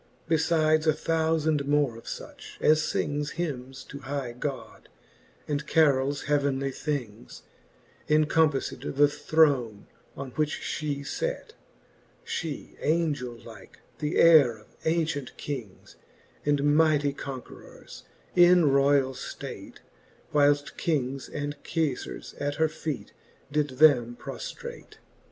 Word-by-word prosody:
Befides 155 -1 +2
a 155 - +5
thoufand 160 -2 0
more 145 -4 +2
of 115 - -12
fuch, - - -9
as 155 0 +3
fings 145 0 -2
Hymnes 135 -6 -5
to 140 - -8
high 135 -2 -4
God, 130 +3 -6 0.6
and 150 0 -2
carols 145 -3 +3
heavenly 140 -2 0
things, 125 - -5 0.7
Encompafled 155 -2 +1
the 145 +1 +6
throne, 140 -8 +2 0.3
on 135 -1 -6
which 155 +2 -1
fhe 145 -2 -3
fate: - - -3 0.7
She 160 -4 -5
Angel 150 -6 0
like, 115 -4 -13 0.2
the 150 0 -2
heyre 150 -9 +6
of 105 - -24
ancient 160 -5 -1
kings 120 -10 -7 0.5
And 145 -1 +2
mightie 150 -3 +3
conquerors, 135 -2 -9 0.3
in 175 -4 +6
royall 140 -1 +3 0.3
(late, - - -8 0.5
Whileft 145 -1 +2
kings 135 -4 -1
and 145 0 -5
Kefars 160 -6 -3
at 145 0 -1
her 160 0 +2
feet 155 -2 -5 0.4
did 145 -3 -1
them 125 -6 +5
proflrate. - - -8
145 Hz, 110 wpm, -27 LUFS, 135-155 Hz, 0.7 s, the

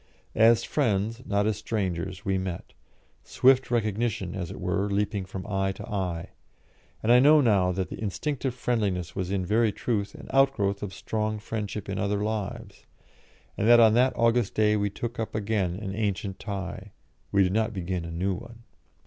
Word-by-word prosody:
As 115 +1 +5
friends, 110 +2 0
not 100 0 +1
as 110 -2 0
strangers, 95 -3 -3
we 95 -1 +1
met 95 -2 -5 0.5
swift 130 0 +3
recognition, 110 -3 -1
as 90 -3 -4
it - - -8
were, 100 +2 -1
leaping 100 -1 -1
from 95 0 -7
eye 95 -2 0
to - - -9
eye; 90 -5 -3 0.7
and 110 - +3
I 125 - +8
know 150 +4 +7
now 100 -9 +3
that 90 0 -2
the - - -7
instinctive 130 +5 -2
friendliness 100 -9 -1
was 95 -2 -2
in 95 -2 -1
very 110 +3 +2
truth 100 -1 -2
an - - -11
outgrowth 135 -8 +2
of 100 - -4
strong 110 +1 -2
friendship 105 -1 -5
in 100 -1 -3
other 100 0 0
lives, 110 0 -5 0.7
and 105 - 0
that 120 0 +8
on 110 -2 +7
that 125 +3 +4
August 115 -2 +2
day 105 0 +3
we 100 -1 0
took 120 +4 -5
up 110 - -3
again 100 -4 0
an 95 0 -5
ancient 100 -2 -2
tie, 95 -1 -6 0.4
we 100 -1 +4
did 90 0 0
not 110 +1 +1
begin 90 -3 -3
a 85 - -6
new 90 +4 -1
one. 115 +4 -10
105 Hz, 180 wpm, -27 LUFS, 95-115 Hz, 0.7 s, I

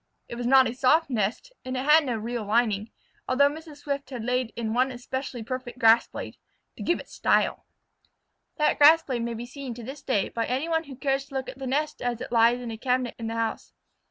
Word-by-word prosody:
It - - -8
was 240 0 -3
not 265 0 +6
a 230 - -3
soft 280 +5 +3
nest, 230 - -2
and 255 0 -4
it 255 - -2
had 305 +2 +6
no 245 - 0
real 230 +1 -4
lining, 215 0 +1 0.4
although 280 +2 +4
Mrs. 315 -1 -10
Swift 280 -2 -3
had 250 -4 -6
laid 250 -1 0
in 225 -2 -2
one 255 +2 +2
especially 250 0 -5
perfect 255 +1 -6
grass 230 -1 +5
blade - - -8 0.4
"to - - -10
give 345 - +1
it - - -10
style." - - +1 0.9
That 300 - +2
grass 315 +3 +8
blade 250 -5 -3
may 235 0 -3
be 235 +2 -6
seen 260 -1 -7
to 240 - -9
this 270 +5 -8
day 210 -7 0
by 230 -1 -2
any 265 +6 -1
one 325 0 0
who 275 -2 -9
cares 270 0 -1
to 275 0 -13
look 260 -1 -3
at 260 +1 -10
the 265 - -4
nest 295 +4 -1
as 245 -2 -2
it - - -7
lies 235 +1 +4
in 240 -2 -5
a 220 - -7
cabinet 250 -1 0
in 225 - -4
the 225 - -3
house. 225 -1 -3
255 Hz, 235 wpm, -26 LUFS, 235-275 Hz, 0.9 s, grass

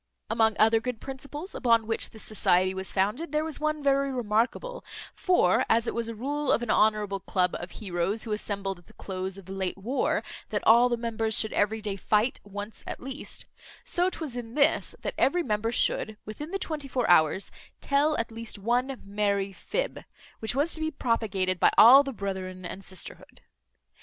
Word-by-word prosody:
Among 225 -1 +3
other 225 +1 +5
good 230 0 -4
principles 280 - -8
upon 230 -3 +3
which 225 0 -1
this 220 - -9
society 185 -3 +3
was 190 0 -3
founded, 215 - 0
there 305 0 +1
was 315 -2 -2
one 305 -1 -1
very 275 0 +2
remarkable; 245 - -1 0.3
for, 355 - +3
as 230 +1 +3
it - - -2
was 230 -1 -1
a 230 - -5
rule 285 +5 -1
of 240 - +2
an 235 - -1
honourable 210 -2 +2
club 180 -1 0
of 175 - -7
heroes, 190 +1 -2
who 225 - -5
assembled 200 -3 -3
at 175 - -23
the - - -18
close 190 0 -5
of 195 - -11
the 190 - -10
late 190 -1 -3
war, 235 +8 0 0.3
that - - -2
all 235 +2 +7
the 240 - 0
members 225 -2 -1
should 220 - 0
every 215 +2 +1
day 205 -2 -3
fight 215 +6 +1
once 205 +2 -8
at - - -5
least; 270 +2 -6 0.4
so 355 +1 +1
'twas 315 -8 -4
in 235 -1 -6
this, 295 +1 +2
that - - -2
every 350 +5 +3
member 220 -2 -1
should, 220 -2 0
within 295 +9 -7
the 390 - -2
twenty 310 -6 -4
four 250 -2 -1
hours, 175 +2 +4 0.3
tell 290 +2 +2
at 230 0 -2
least 225 -1 -6
one 245 +5 0
merry 200 -1 0
fib, - - -3 0.4
which 220 +2 -1
was 295 +5 +1
to - - -4
be 315 - 0
propagated 210 - -1
by - - +5
all 260 +5 +10
the 275 -1 -4
brethren 190 -4 -5
and 190 +2 -6
sisterhood. 185 -1 -7
225 Hz, 190 wpm, -27 LUFS, 200-270 Hz, 0.4 s, all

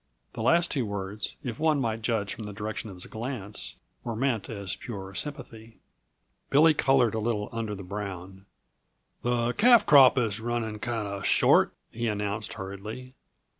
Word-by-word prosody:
The - - -5
last 170 0 +3
two 135 -4 +1
words, 100 0 -3
if 120 -3 -5
one 155 -2 +2
might 115 -3 -1
judge 105 -3 -1
from 110 - -8
the 105 - -7
direction 110 +2 -4
of 95 - -9
his 90 - -6
glance, 110 - -4 0.3
were 115 - -4
meant 120 -3 -1
as 100 -4 -4
pure 95 -5 -8
sympathy. 115 -3 -4 0.7
Billy 155 +3 +6
colored 130 -5 +3
a 110 - -1
little 105 -2 -1
under 115 -2 -3
the 100 - -8
brown. 95 -1 -7 0.7
"The 120 0 0
calf 235 +2 +6
crop 140 -2 +7
is 110 -4 +1
running 115 -2 -3
kinda 105 -4 -3
short," - - +4 0.2
he 120 +1 -3
announced 105 0 -2
hurriedly. 110 +5 -7
110 Hz, 160 wpm, -27 LUFS, 100-120 Hz, 0.7 s, crop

